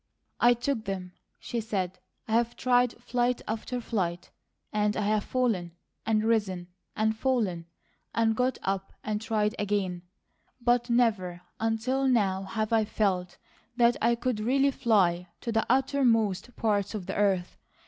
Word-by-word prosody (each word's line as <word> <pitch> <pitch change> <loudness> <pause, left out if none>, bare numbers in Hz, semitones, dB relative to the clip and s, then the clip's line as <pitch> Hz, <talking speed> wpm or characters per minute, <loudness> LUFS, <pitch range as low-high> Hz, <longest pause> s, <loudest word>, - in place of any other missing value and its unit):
"I 240 0 +6
took 240 -1 -2
them," 185 -2 -4 0.3
she 235 - -4
said. 190 -4 -3 0.3
"I've 230 +1 +1
tried 245 -1 +3
flight 245 0 0
after 225 +3 -3
flight; 180 -7 -2 0.4
and 210 0 +1
I've 210 0 +1
fallen, 220 -10 0 0.3
and 215 -1 +2
risen, 200 -6 0 0.3
and 220 0 +1
fallen, 215 -10 0 0.4
and 225 -1 +2
got 250 +1 +1
up 195 0 -2
and 215 0 -2
tried 215 -1 0
again, 195 -4 -1 0.6
but 240 0 +2
never 205 -8 +1 0.2
until 225 +5 0
now 200 -7 +2
have 215 +3 -2
I 225 -1 +4
felt 190 -4 -1 0.4
that 240 -1 +5
I 235 +1 +3
could 240 -1 -2
really 270 +5 +3
'fly 185 -9 +2
to 235 - -3
the 225 -1 +1
uttermost 245 -5 +2
parts 205 -1 0
of 195 -4 -4
the - - -4
earth.' 195 -3 +1
220 Hz, 140 wpm, -28 LUFS, 195-240 Hz, 0.6 s, I